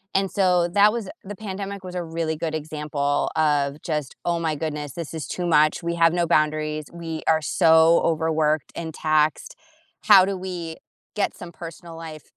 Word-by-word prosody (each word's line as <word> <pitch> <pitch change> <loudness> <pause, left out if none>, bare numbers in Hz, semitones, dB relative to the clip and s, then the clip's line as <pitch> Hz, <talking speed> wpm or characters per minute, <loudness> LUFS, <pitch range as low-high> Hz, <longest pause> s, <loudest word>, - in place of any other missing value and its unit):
and 195 -1 +2
so, 180 -3 +3
that 205 +1 +6
was 230 -5 -4
a - - -7
The 205 +1 -7
pandemic 200 -1 -6
was 180 0 -7
a 175 - -2
really 165 -1 -3
good 160 0 -3
example 150 -2 -2
of 145 -2 +1
just, 150 -4 -3
"Oh 170 -1 +1
my 160 -2 0
goodness, 150 -2 -4
this 165 -2 -6
is 155 -5 -4
too 180 - -3
much, 155 +1 +3
we 170 0 -1
have 165 0 +4
no 175 -1 +1
boundaries, 155 -1 +1
we 165 -2 -5
are 160 -1 +3
so 160 0 +5
overworked 160 -2 +1
and 160 -2 -5
taxed. 155 -1 0 0.5
How 195 -3 +8
do 195 0 -2
we 175 -3 -6 0.4
get 205 - 0
some 175 -1 -9
personal 165 0 -9
life 160 -2 -9
165 Hz, 185 wpm, -23 LUFS, 155-175 Hz, 0.5 s, How